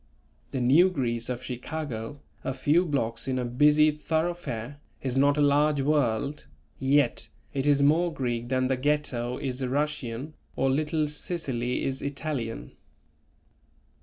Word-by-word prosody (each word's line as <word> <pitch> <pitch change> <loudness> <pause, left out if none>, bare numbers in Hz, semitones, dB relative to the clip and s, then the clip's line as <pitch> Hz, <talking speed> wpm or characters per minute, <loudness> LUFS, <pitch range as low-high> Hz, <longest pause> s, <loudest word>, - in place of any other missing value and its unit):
The 130 - -3
New 150 +10 +6
Greece 120 -8 -2
of 125 0 -3
Chicago, 130 0 -5 0.2
a 135 - -2
few 150 +7 +3
blocks 115 -5 -1
in 130 -1 0
a 125 - -1
busy 150 +5 +4
thoroughfare, 150 -5 -3 0.2
is 130 -2 -1
not 140 +2 +4
a - - +3
large 145 0 +3
world, 140 -1 0 0.3
yet 135 -1 +2 0.2
it 135 0 -1
is 140 -1 +4
more 165 +4 +3
Greek 120 -5 -3
than 130 0 +1
the 130 0 0
Ghetto 130 -3 -1
is 130 -1 -3
Russian 140 0 -2 0.2
or 135 - +2
Little 155 +2 0
Sicily 135 -6 -2
is 135 0 -2
Italian. 140 - -4
140 Hz, 135 wpm, -27 LUFS, 125-150 Hz, 0.3 s, New